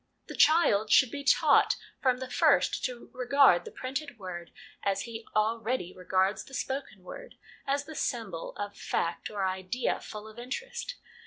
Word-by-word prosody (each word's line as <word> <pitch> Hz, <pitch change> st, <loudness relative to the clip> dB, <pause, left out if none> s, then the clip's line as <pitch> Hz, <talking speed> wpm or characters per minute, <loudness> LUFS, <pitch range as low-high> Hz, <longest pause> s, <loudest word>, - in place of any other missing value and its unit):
The -, -, -6 dB
child 220 Hz, -10 st, +4 dB
should 255 Hz, -3 st, +6 dB
be 285 Hz, -1 st, -5 dB
taught 275 Hz, -, +5 dB, 0.3 s
from 255 Hz, -2 st, +3 dB
the 260 Hz, 0 st, -5 dB
first 285 Hz, +3 st, +3 dB
to 250 Hz, -2 st, -6 dB
regard 255 Hz, -7 st, +4 dB
the -, -, -8 dB
printed 270 Hz, 0 st, -5 dB
word 180 Hz, -4 st, -7 dB, 0.3 s
as 195 Hz, -1 st, 0 dB
he 225 Hz, -1 st, -8 dB
already 220 Hz, -2 st, 0 dB
regards 190 Hz, +2 st, +1 dB
the 270 Hz, -, -10 dB
spoken 265 Hz, -8 st, -4 dB
word, -, -, -10 dB, 0.3 s
as 280 Hz, +1 st, 0 dB
the 315 Hz, -, -9 dB
symbol 225 Hz, -, -3 dB
of 205 Hz, 0 st, -5 dB
fact 170 Hz, -, -2 dB
or 200 Hz, -2 st, -2 dB
idea 190 Hz, +6 st, -1 dB
full 210 Hz, 0 st, -9 dB
of 220 Hz, +2 st, -11 dB
interest. 475 Hz, -, -5 dB
235 Hz, 160 wpm, -29 LUFS, 200-275 Hz, 0.3 s, should